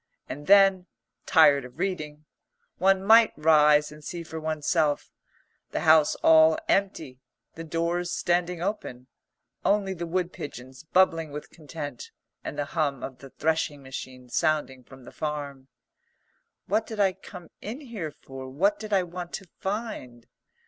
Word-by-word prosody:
And 145 +1 -8
then, 195 -2 +5 0.4
tired 145 -5 +5
of 125 +2 -12
reading, 155 -5 -4 0.5
one 190 +1 +3
might 225 +2 +6
rise 150 -1 +4
and 150 0 -13
see 170 +3 -6
for 160 0 -7
oneself, 155 -1 0 0.6
the - - -3
house 155 -1 +5
all 160 0 +6
empty, 190 -10 -1 0.3
the 165 - -8
doors 170 +2 -2
standing 175 0 0
open, 155 - -4 0.6
only 200 -1 +1
the 170 -1 -5
wood 180 +1 -2
pigeons 130 -1 -9
bubbling 165 -4 +3
with 150 +1 -8
content 155 - -8 0.3
and - - -6
the 145 - -1
hum 145 -3 -2
of 130 -2 -7
the 135 - -12
threshing 150 -1 -1
machine 130 -1 -8
sounding 135 -1 -1
from 135 0 -15
the - - -11
farm. 145 -3 -5 1.0
"What 215 +3 0
did 220 -2 -7
I 195 -2 +3
come 180 -2 -12
in 235 +8 -6
here 225 - -6
for? 135 -2 -10
What 195 +10 +1
did 215 -1 -8
I 190 -2 +3
want 175 0 -7
to 195 - -6
find?" 190 - -5
160 Hz, 150 wpm, -26 LUFS, 145-185 Hz, 1.0 s, might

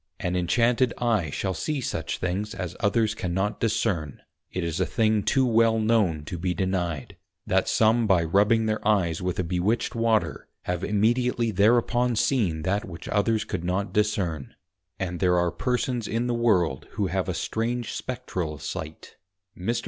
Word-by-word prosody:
_ - - -2
An 90 - -1
inchanted 115 +7 +2
eye 110 -9 +1
shall 95 +7 -2
see 150 - -2
such 85 -9 -3
things 100 +5 -3
as 90 -4 -5
others 110 +1 +2
cannot 95 +1 -2
discern; 105 - -1 0.3
it 90 - -3
is 85 0 -2
a 95 - +2
thing 110 +3 +2
too 130 +6 +2
well 115 -1 +3
known 105 -9 +1
to 85 +1 -5
be 90 0 -1
denied, 95 +1 -2 0.3
that 95 0 +1
some 115 +1 +3
by 90 -4 +4
rubbing 105 +7 +3
their 110 0 0
eyes 90 -7 +2
with 90 -1 -2
a 90 - 0
bewitched 90 +7 0
Water, 115 -2 0 0.2
have 90 0 -3
immediately 115 +3 +1
thereupon 120 +4 +3
seen 100 - +1
that 100 +5 0
which 85 -7 -9
others 105 +1 +1
could 95 -4 -4
not 90 +2 -1
discern; 95 -9 -1 0.4
and 90 -2 -3
there 90 -2 +3
are 85 -1 +2
Persons 125 -2 -1
in 115 +2 -1
the 120 - 0
World, 90 - +1
who 105 -1 -1
have 95 0 -1
a 90 - -2
strange 115 +4 -2
Spectral 95 - -4
sight. 75 +3 -7 0.4
Mr. 115 +6 -1
105 Hz, 170 wpm, -26 LUFS, 90-115 Hz, 0.4 s, by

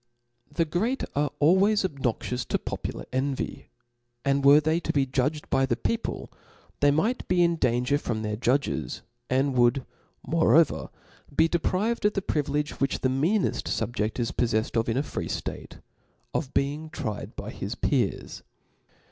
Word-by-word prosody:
The 165 +3 +1
great 215 - -1
are 145 +1 +1
always 190 +7 +4
obnoxious 125 -5 -2
to - - 0
popular - - -5
en 135 +1 0
vy; - - -5 0.6
and 140 0 +2
were 140 +2 +8
they 155 +2 +1
to - - -2
be 140 -2 +2
judged 140 +4 -1
by 135 0 +3
the 120 - +1
people, 230 - -3
^ - - -31 0.4
they 145 - +5
might 205 - +1
be 180 -1 +3
in 170 0 +3
danger 125 0 +1
from 110 -5 -3
their 105 0 -2
judges, 120 - -1 0.3
and 135 +2 +2
would 125 +2 +3 0.4
moreover 165 -1 +3 0.5
be 160 - +5
deprived 185 +8 0
of 210 - +4
the 195 - -2
privilegoK 150 -2 -1
which 135 - 0
the 130 - +2
meaneft 165 +11 +1
fubjefi 110 -1 -2
is 115 - 0
poffeffed 115 -2 0
of 115 - -1
in 115 - 0
a 140 - +1
free - - -4
ftate, - - -5 0.5
of 140 -4 -2
being 145 +3 0
tried 110 -9 -5
by - - -6
his - - -5
peers. - - -1
145 Hz, 165 wpm, -27 LUFS, 125-165 Hz, 0.6 s, were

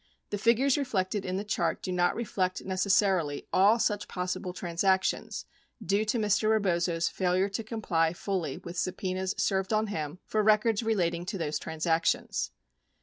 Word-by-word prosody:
The 205 - -2
figures 250 +6 +3
reflected 200 -6 -1
in 185 0 -2
the 200 - -2
chart 175 -6 -1
do 185 - -3
not 175 -1 +2
reflect 185 -5 -2
necessarily 190 -5 +1
all 205 +5 +5
such 210 -3 0
possible 180 0 -3
transactions 185 +2 0 0.3
due 205 0 0
to 215 +3 0
Mr. 215 0 +2
Rebozo's 175 -5 +1
failure 185 +1 +1
to 200 +3 -3
comply 190 -8 0
fully 175 -6 -3
with 170 +1 -9
subpenas 185 0 -2
served 190 0 0
on 215 0 +2
him 155 0 -4
for 215 - 0
records 215 +1 +3
relating 175 -7 0
to 195 - -3
those 155 -3 -2
transactions. 160 - 0
190 Hz, 150 wpm, -29 LUFS, 175-210 Hz, 0.3 s, all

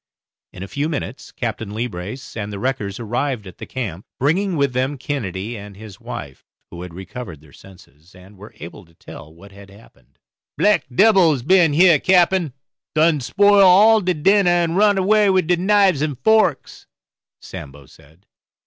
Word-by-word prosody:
In 95 - -9
a - - -7
few 145 +8 -3
minutes 150 - -6
Captain 105 -2 -5
Leebrace 110 +2 -6
and 105 -2 -5
the 100 - -6
wreckers 105 -4 -4
arrived 120 0 -3
at 95 - -13
the - - -9
camp, 105 -8 -6
bringing 180 +7 0
with 140 -3 0
them 130 +3 -2
Kennedy 115 -6 -5
and 100 -2 -11
his 105 -2 -12
wife, 70 -2 -9 0.3
who 85 - -9
had 90 -1 -9
recovered 95 - -9
their 75 -1 -21
senses, 90 -3 -19
and 95 +3 -17
were 105 +2 -14
able 85 +3 -11
to 85 0 -27
tell 75 - -13
what 95 +5 -17
had 100 0 -15
happened. 100 - -21 0.4
"Black - - +2
debbils 170 - +3
been 175 0 +3
heah, 170 -1 +5
cappen, 180 -5 +2 0.4
done 155 -1 +3
spoil 200 +9 +3
all 215 +4 +5
de 180 -1 -1
dinner, 195 +4 +3
and 175 -1 +1
run 205 0 +3
away 205 +2 +3
wid 185 -2 +2
de 175 +2 +1
knives 190 -4 +2
and 150 -4 -2
forks," 220 - 0 0.5
Sambo 70 0 -11
said. 80 +8 -22
130 Hz, 170 wpm, -19 LUFS, -, 0.5 s, heah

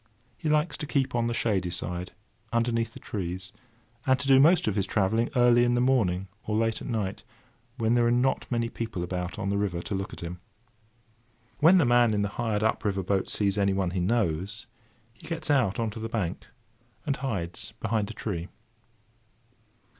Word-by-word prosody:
He 155 - -3
likes 150 0 +2
to 150 - -5
keep 135 -3 0
on 120 -1 +1
the 120 - -1
shady 95 -7 0
side, 90 +1 -4 0.4
underneath 115 -1 0
the - - -10
trees, 95 -1 -5 0.6
and 130 0 +4
to 135 - -3
do 135 -1 +7
most 165 +2 +5
of 105 - +1
his 100 -3 0
travelling 110 +3 +1
early 120 -1 +5
in 120 0 +2
the - - +2
morning 105 -8 +2 0.2
or 105 - 0
late 115 0 0
at - - -6
night, 105 -6 -2 0.5
when 115 -1 +2
there 120 -1 +3
are - - +3
not 125 +2 +1
many 115 -1 +1
people 115 -6 -4
about 90 +1 -4
on 100 -2 -2
the 100 - 0
river 95 -4 -1
to 105 - -5
look 95 0 -3
at - - -9
him. 85 +1 -6 1.2
When 165 +5 +7
the 170 - +4
man 120 -2 +4
in 105 - +1
the 100 - -1
hired 110 0 -1
up 110 - +1
river 95 -2 0
boat 95 +1 0
sees 100 -1 +1
anyone 95 -2 +1
he 90 - -2
knows, 100 +1 0 0.5
he 110 - -15
gets 165 -2 -2
out 120 -9 +2
on 115 -2 -1
to 110 - -8
the 115 +1 -4
bank, 105 -7 -3 0.6
and 140 - 0
hides 105 -7 -3
behind 110 -2 -1
a - - -6
tree. 90 -6 -4
110 Hz, 195 wpm, -27 LUFS, 95-120 Hz, 1.2 s, do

